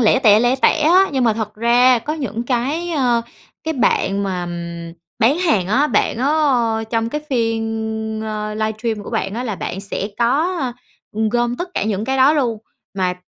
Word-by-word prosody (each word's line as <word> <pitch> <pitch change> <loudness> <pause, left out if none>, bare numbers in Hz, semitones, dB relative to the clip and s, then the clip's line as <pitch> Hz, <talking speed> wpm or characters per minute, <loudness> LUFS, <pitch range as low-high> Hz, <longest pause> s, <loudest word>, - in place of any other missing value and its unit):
lẻ 235 +2 +4
tẻ, 215 -5 +5
lẻ 245 +2 +2
tẻ 315 - +4
á 365 +5 +5
nhưng 260 -2 +1
mà 225 - +4
thật 215 -1 -4
ra, 240 +2 +4
có 300 - -4
những 235 -7 -4
cái, 275 +8 -1
ơ 250 -7 +1 0.4
cái 320 0 -2
bạn 200 -5 +1
mà 185 -3 -2 0.7
bán 260 +8 +3
hàng 220 - +1
á, 265 +10 +2
bạn 220 -3 +1
á 265 - +1 0.6
trong 230 -1 0
cái 300 +5 -3
phiên, 225 -2 -2
ơ, 215 0 -4
livestream 220 0 -2
của - - -8
bạn 195 +1 -2
á 240 - -3
là 220 -5 -2
bạn 190 - -5
sẽ 200 0 -4
có, 295 +10 +1 0.6
ưm, 220 +1 0
gom 240 +1 0
tất 355 +1 -4
cả - - 0
những 210 0 -1
cái 265 +2 -1
đó 265 +3 +5
luôn. 245 -7 0 0.4
Mà 180 -1 +1
230 Hz, 190 wpm, -19 LUFS, 215-265 Hz, 0.7 s, tẻ